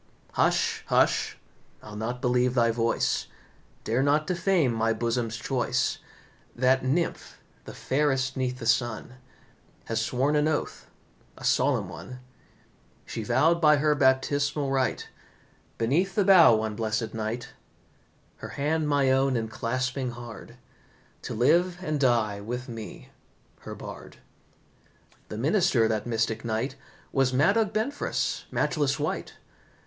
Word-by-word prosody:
"Hush, - - +1
hush, - - +2 0.5
I'll 105 -1 -10
not 120 +4 -4
believe 125 0 +2
thy 115 -2 +3
voice, 115 0 0 0.6
Dare 115 +4 0
not 145 +2 +2
defame 175 -6 +1
my 115 0 +1
bosom's 115 0 -2
choice. 125 +2 -1 0.6
That 130 +2 +2
nymph, 150 +7 -2 0.3
the - - -9
fairest 135 -1 0
'neath 130 -1 -2
the 120 - -7
sun, 120 +1 0 0.7
Has 115 0 -1
sworn 130 +6 0
an 150 +1 +2
oath, 155 -2 -3 0.5
a - - -12
solemn - - +2
one; 125 - -9 0.9
She - - -5
vowed 170 +2 +2
by 150 -1 +6
her 150 +1 +3
baptismal 140 +1 +1
rite, 130 -1 -1 0.7
Beneath 165 +12 +1
the 205 - +2
bough 180 - +7
one 110 -1 -2
blessed 110 0 -2
night, 115 +2 -4 0.9
Her - - -8
hand 150 +2 -1
my 140 -2 +3
own 135 0 +2
enclasping 125 +3 -2
hard, 120 -3 -10 0.6
To - - -5
live 170 +9 +3
and 155 -4 -1
die 115 -6 +1
with 125 +5 -5
me, 110 - -9 0.5
her - - -8
Bard. - - -10 1.1
The 105 - -6
minister 140 - +2
that 110 0 -2
mystic 115 -1 -1
night 115 +3 -2 0.4
Was 135 -2 +2
Madog 195 - +3
Benfras, 225 +7 -2
matchless - - 0
wight. - - -3
130 Hz, 125 wpm, -27 LUFS, 115-150 Hz, 1.1 s, bough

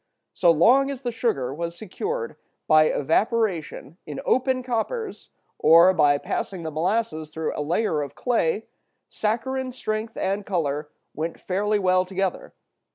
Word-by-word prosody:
So 175 - +3
long 245 - +5
as 275 -1 -6
the 245 - -1
sugar 140 - -1
was 170 +2 -5
secured 445 - -4 0.3
by 155 0 +6
evaporation 170 - 0
in 145 -2 -6
open 255 0 +1
coppers, 380 - -3 0.3
or 170 +4 +7
by 145 -4 +4
passing 180 +4 -4
the 160 - -4
molasses 165 -1 -1
through 160 0 -3
a - - -2
layer 160 +1 0
of 140 - -6
clay, 225 -4 0 0.5
saccharine 255 +4 -2
strength 220 -2 -4
and 195 +2 -1
color 150 -6 -2 0.2
went 165 +2 -4
fairly 210 +3 0
well 185 -2 +3
together. 190 0 -3
190 Hz, 140 wpm, -24 LUFS, 160-230 Hz, 0.5 s, or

